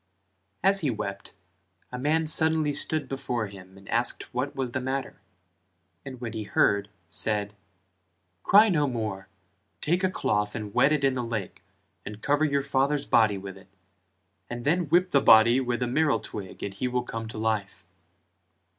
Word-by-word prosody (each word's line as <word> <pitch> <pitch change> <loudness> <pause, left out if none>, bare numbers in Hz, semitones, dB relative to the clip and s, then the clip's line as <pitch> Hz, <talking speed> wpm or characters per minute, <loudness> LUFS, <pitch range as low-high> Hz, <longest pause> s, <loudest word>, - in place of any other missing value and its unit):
As 195 +1 +4
he 150 - 0
wept 100 -4 -5 0.6
a 125 - -5
man 155 +4 +1
suddenly 160 -1 +3
stood 155 +1 -1
before 125 -4 -3
him 95 -1 -12
and 95 0 -16
asked 120 +1 -1
what 130 +3 -2
was 130 -2 -3
the 130 - -2
matter, 130 +1 -4 0.8
and 130 -2 -9
when 120 -2 -5
he 110 - -4
heard, 100 -1 +1 0.2
said 105 +3 -2 0.9
"Cry 210 - +6
no 150 -6 +2
more: 110 -6 -4 0.5
take 175 +4 0
a 185 - +3
cloth 105 - -1
and 105 -3 -6
wet 140 - +4
it 150 -2 +1
in 135 -1 +3
the 125 -1 -2
lake 110 -5 -5 0.4
and 105 0 -8
cover 145 +4 +1
your 140 -2 0
father's 140 +1 0
body 105 -3 +3
with 95 0 -8
it: 95 0 -16 0.8
and 120 0 -6
then 170 +4 +2
whip 180 +3 +3
the 140 - +4
body 115 +1 +6
with 125 -1 -1
a - - +1
meral 150 +4 +1
twig 100 -3 -8
and 100 - -4
he 125 +6 -2
will 125 0 -1
come 115 -2 -6
to 110 - -8
life." 110 -5 -2
125 Hz, 170 wpm, -26 LUFS, 105-145 Hz, 0.9 s, Cry